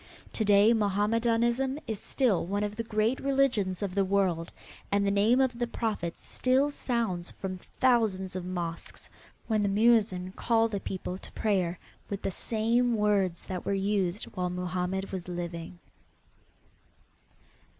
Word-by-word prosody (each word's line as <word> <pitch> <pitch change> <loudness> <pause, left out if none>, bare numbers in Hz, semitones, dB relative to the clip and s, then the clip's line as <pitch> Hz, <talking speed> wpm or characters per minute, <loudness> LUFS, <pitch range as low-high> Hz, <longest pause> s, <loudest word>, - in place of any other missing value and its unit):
To 220 - 0
day 205 +2 +6
Mohammedanism 230 +5 +1
is 220 -3 -4
still 240 -10 +1
one 200 +2 -1
of 210 0 -3
the 230 - -2
great 220 +3 0
religions 250 -9 +1
of 195 -2 -2
the 195 0 +2
world, 185 -4 0 0.4
and 200 0 +2
the 200 - +2
name 210 +5 +4
of 255 -3 +1
the 240 - 0
Prophet 215 -8 -3
still 265 +3 +1
sounds 230 -11 -2
from 185 -1 -6 0.2
thousands 220 -8 +2
of 185 - -3
mosques, 175 -2 -5 0.3
when 220 -2 +1
the 200 - +1
muezin 205 -4 +3
calls 225 +2 +1
the 200 - -1
people 185 -1 -5
to - - -10
prayer 185 -5 0 0.3
with 200 -1 -4
the - - -1
same 230 +4 +1
words 200 -4 +1
that 185 -2 -4
were 200 - 0
used 195 -1 0
while 180 -1 -1
Mohammed 180 +1 -2
was 185 -2 -5
living. 175 -1 -5
200 Hz, 150 wpm, -29 LUFS, 185-230 Hz, 0.4 s, day